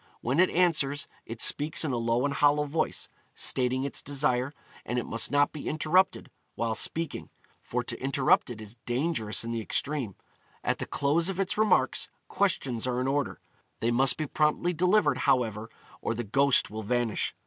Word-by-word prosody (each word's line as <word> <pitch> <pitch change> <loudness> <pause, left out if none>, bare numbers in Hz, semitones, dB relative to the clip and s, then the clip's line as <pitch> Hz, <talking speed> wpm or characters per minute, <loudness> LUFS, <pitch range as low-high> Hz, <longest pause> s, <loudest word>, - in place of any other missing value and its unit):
When 130 +7 0
it 185 - +5
answers, 150 -5 +2 0.2
it 115 0 -2
speaks 150 +2 +1
in 145 - -1
a 125 - -1
low 115 +2 +1
and 145 - 0
hollow 145 +1 +3
voice, 150 +2 -2 0.3
stating 130 0 0
its 140 - -3
desire; 135 -2 0 0.3
and 120 - -3
it 120 - -1
must 115 - +1
not 145 0 +3
be 150 - -7
interrupted 165 +5 +1 0.2
while 115 -1 -1
speaking, 160 +8 -2 0.3
for - - -3
to - - -6
interrupt 135 -1 +2
it 120 -3 -7
is 110 +2 -10
dangerous 120 -4 0
in 115 - -4
the 115 -1 -2
extreme. 130 -3 -2 0.5
At - - 0
the - - -4
close 155 +5 +1
of 195 -1 -4
its 195 -1 0
remarks, 215 0 +2 0.2
questions 130 - 0
are 125 0 0
in 130 - -1
order. 140 0 -1 0.4
They 115 - +1
must 130 +2 +3
be 155 - -2
promptly 150 +4 +1
delivered, 180 +6 +3
however, 115 -5 +1 0.3
or 115 - -1
the 120 - -3
ghost 135 +5 +2
will 110 +1 -5
vanish. 120 0 -1
135 Hz, 180 wpm, -28 LUFS, 120-155 Hz, 0.5 s, it